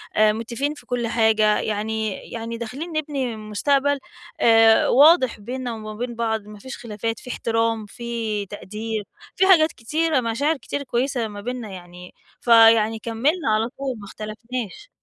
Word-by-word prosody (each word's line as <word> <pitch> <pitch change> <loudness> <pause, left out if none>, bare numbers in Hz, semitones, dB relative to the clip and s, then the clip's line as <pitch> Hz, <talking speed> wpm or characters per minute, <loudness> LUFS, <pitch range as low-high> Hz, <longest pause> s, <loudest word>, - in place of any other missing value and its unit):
آآ، 215 0 +5
متفقين 235 +6 -3
في 300 - -15
كل 245 -1 -2
حاجة 220 -2 +3
يعني 220 +1 -2 0.2
يعني 230 0 -5
داخلين 250 +9 -6
نبني 285 -6 -2
مستقبل، 275 +7 0 0.4
آآ، 225 -1 +6
واضح 280 -3 +5
بيننا 245 +3 -5
وما 215 -1 -7
بين 240 +2 -5
بعض 225 -1 -1
ما 210 0 -11
فيش 260 +5 -8
خلافات، 225 -1 -4
في - - -11
احترام، 225 -2 -1
في 225 -1 -4
تقدير، 210 +2 -5 0.3
في 380 - +3
حاجات 325 -5 +6
كتيرة، 305 +5 0
مشاعر 280 +7 0
كتير 285 +1 -5
كويسة 250 -2 -1
ما 205 -1 -8
بيننا 245 0 -5
يعني، 180 -1 -11 0.3
فيعني 225 -1 +6
كمّلنا 235 +8 0
على 220 +2 0
طول 265 -4 -4
ما 205 - -10
اختلفناش. 220 - -7
230 Hz, 150 wpm, -23 LUFS, 215-260 Hz, 0.4 s, آآ